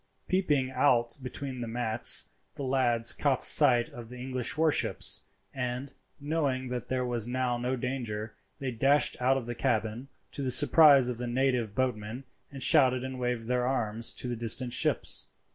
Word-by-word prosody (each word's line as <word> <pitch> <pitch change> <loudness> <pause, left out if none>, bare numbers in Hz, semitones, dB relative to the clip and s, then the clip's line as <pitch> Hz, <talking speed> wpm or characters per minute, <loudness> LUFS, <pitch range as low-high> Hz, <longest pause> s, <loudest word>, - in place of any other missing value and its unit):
Peeping 150 -9 0
out 120 -3 +1
between 130 0 -6
the 120 - -5
mats, 115 0 +3 0.3
the 140 - -6
lads 120 -3 +2
caught 135 -3 0
sight 125 -5 +6
of 115 -2 -11
the 125 - -9
English 130 +1 -3
warships, 160 -1 +1 0.3
and, 125 +1 -5 0.3
knowing 140 -4 -2
that 125 -1 -5
there 130 -1 -1
was 120 -2 -2
now 125 0 -1
no 125 +2 -2
danger, 120 -4 -5 0.2
they 135 -2 -4
dashed 135 +5 +2
out 130 +2 +2
of 130 - -5
the 120 - -5
cabin, 110 +2 -2 0.2
to - - -6
the 130 - -2
surprise 140 0 +5
of 125 -2 -4
the 125 - -4
native 125 -3 -1
boatmen, 125 -1 -3 0.3
and 135 -1 -6
shouted 130 -5 +3
and 130 -1 -6
waved 120 -2 -3
their 125 0 0
arms 115 -3 -1
to - - -4
the 120 - -3
distant 120 +2 -2
ships. - - 0
125 Hz, 170 wpm, -28 LUFS, 120-135 Hz, 0.3 s, sight